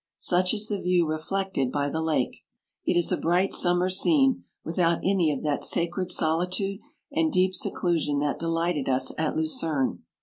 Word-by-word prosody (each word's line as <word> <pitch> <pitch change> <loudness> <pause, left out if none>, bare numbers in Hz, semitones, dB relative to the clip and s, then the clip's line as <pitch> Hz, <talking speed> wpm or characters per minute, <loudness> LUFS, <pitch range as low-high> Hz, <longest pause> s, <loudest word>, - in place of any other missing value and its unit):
Such 180 +3 +2
is 215 0 -1
the 205 -3 -3
view 180 -1 +2
reflected 155 -3 -2
by 145 0 0
the 160 +3 -2
lake; 155 -6 -1 0.4
it 175 - +2
is 175 - +1
a - - +1
bright 180 +4 +1
slimmer 180 +1 +2
scene 270 - +3 0.2
without 170 0 +1
any 185 -5 +2
of 140 - -4
that 150 -2 -1
sa - - +1
95 170 0 -3
cred 185 0 -3
solitude 180 +4 0 0.3
and 320 +2 +1
deep 185 -3 +2
seclusion 170 -5 0
that 145 0 -1
delighted 165 -3 -1
us 130 0 +1
at 155 -1 -1
Lucerne. 155 -3 0
175 Hz, 175 wpm, -26 LUFS, 155-185 Hz, 0.4 s, scene